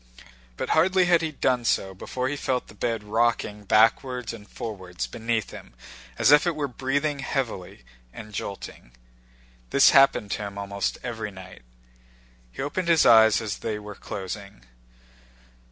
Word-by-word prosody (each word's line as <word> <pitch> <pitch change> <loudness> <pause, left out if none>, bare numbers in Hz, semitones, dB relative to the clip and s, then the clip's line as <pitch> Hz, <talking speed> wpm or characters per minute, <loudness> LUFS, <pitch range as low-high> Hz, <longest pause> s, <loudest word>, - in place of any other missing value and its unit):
But - - -4
hardly 185 +3 +3
had 175 -1 +4
he 160 -1 -2
done 130 -4 0
so 95 -4 0
before 125 +7 -4
he 145 - -2
felt 130 -3 -2
the - - -12
bed 115 0 -2
rocking 105 -1 0
backwards 120 +4 +2
and 105 -2 -12
forwards 95 - -6
beneath 110 - -3
him - - -12 0.4
as - - +4
if 150 +4 +6
it 170 - 0
were 150 -2 -2
breathing 140 +3 -1
heavily 115 - -4 0.3
and 105 - -11
jolting. 95 -11 -7 0.8
This - - +6
happened 135 -7 +4
to - - -2
him 100 -1 -6
almost 100 0 -3
every 110 -3 -4
night. 95 -2 -12 0.9
He - - -5
opened 170 +5 -3
his 165 -2 +4
eyes 110 -2 +6
as 105 -2 -4
they 110 -2 -3
were 105 0 -8
closing. 100 - -8
115 Hz, 155 wpm, -25 LUFS, 100-135 Hz, 0.9 s, if